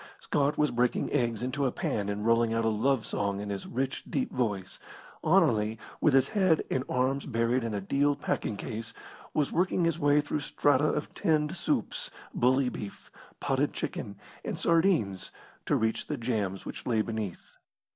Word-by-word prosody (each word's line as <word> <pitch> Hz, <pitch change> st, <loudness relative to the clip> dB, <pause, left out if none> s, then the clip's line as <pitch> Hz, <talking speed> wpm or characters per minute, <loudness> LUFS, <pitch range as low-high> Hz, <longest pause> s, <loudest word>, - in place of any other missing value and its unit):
Scott 145 Hz, 0 st, 0 dB
was 150 Hz, -1 st, +2 dB
breaking 120 Hz, 0 st, +1 dB
eggs 120 Hz, -4 st, +1 dB
into 135 Hz, +2 st, 0 dB
a -, -, 0 dB
pan 100 Hz, -4 st, -2 dB
and 105 Hz, +1 st, -3 dB
rolling 115 Hz, 0 st, +3 dB
out 115 Hz, 0 st, +1 dB
a -, -, +4 dB
love 115 Hz, +2 st, +1 dB
song 100 Hz, -1 st, -1 dB
in 105 Hz, 0 st, -4 dB
his 100 Hz, -1 st, -4 dB
rich, 135 Hz, +2 st, -2 dB
deep 255 Hz, -, -1 dB
voice. 100 Hz, -7 st, -2 dB, 0.4 s
Anerley, 110 Hz, +1 st, +3 dB, 0.2 s
with 150 Hz, -4 st, +4 dB
his 135 Hz, 0 st, +4 dB
head 185 Hz, -7 st, +3 dB
and 130 Hz, -, +1 dB
arms 130 Hz, +2 st, 0 dB
buried 115 Hz, 0 st, +1 dB
in 115 Hz, -2 st, -2 dB
a 100 Hz, -, -2 dB
deal 140 Hz, +8 st, +2 dB
packing 125 Hz, -6 st, -2 dB
case, 115 Hz, +1 st, -5 dB, 0.4 s
was 150 Hz, -3 st, +1 dB
working 180 Hz, 0 st, +2 dB
his 165 Hz, -1 st, 0 dB
way 145 Hz, -1 st, +4 dB
through 150 Hz, 0 st, -1 dB
strata 145 Hz, 0 st, +2 dB
of 150 Hz, -, -3 dB
tinned 150 Hz, -2 st, +1 dB
soups, -, -, -1 dB, 0.2 s
bully 130 Hz, +2 st, +3 dB
beef, 105 Hz, -5 st, -7 dB, 0.3 s
potted -, -, 0 dB
chicken, 100 Hz, -, -4 dB, 0.3 s
and -, -, -3 dB
sardines 165 Hz, -, +2 dB, 0.4 s
to -, -, +3 dB
reach 110 Hz, 0 st, 0 dB
the 150 Hz, -, -2 dB
jams 105 Hz, -6 st, -2 dB
which -, -, -7 dB
lay 110 Hz, -3 st, +2 dB
beneath. 110 Hz, -5 st, -5 dB
125 Hz, 175 wpm, -29 LUFS, 110-145 Hz, 0.4 s, a